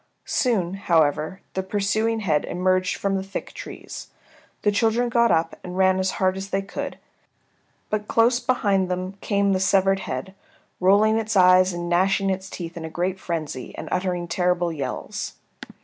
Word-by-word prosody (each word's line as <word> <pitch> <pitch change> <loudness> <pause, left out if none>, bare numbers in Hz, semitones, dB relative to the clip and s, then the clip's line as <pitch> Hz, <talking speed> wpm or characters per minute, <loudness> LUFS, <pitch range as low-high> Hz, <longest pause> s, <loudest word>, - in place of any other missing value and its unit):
Soon, 195 -9 +1
however, 165 -1 +1
the 190 - -1
pursuing 215 +3 0
head 155 -7 +1
emerged 185 +1 +1
from 200 -1 -1
the 190 - 0
thick 195 +1 -6
trees. - - -8 0.6
The 205 - +4
children 225 +3 +2
got 235 -1 +3
up 165 -1 +1
and 180 0 -6
ran 190 0 +4
as 190 0 +1
hard 185 0 +1
as 195 +1 -6
they 195 0 -1
could, 195 - -5 0.9
but 210 0 -1
close 235 +2 +3
behind 200 -8 +1
them 185 +1 -2
came 200 -1 +1
the 185 - +1
severed 195 0 +3
head, 130 +2 -5 0.5
rolling 210 +4 +4
its 220 -1 -1
eyes 185 0 +6
and 175 0 -4
gnashing 195 +3 +2
its 190 0 -4
teeth 170 -2 -7
in 165 - -6
a 160 - -5
great 180 +3 -2
frenzy, 155 -8 -4
and - - -6
uttering 180 -2 -1
terrible 180 -1 +1
yells. 145 -3 -4
190 Hz, 165 wpm, -24 LUFS, 180-200 Hz, 0.9 s, eyes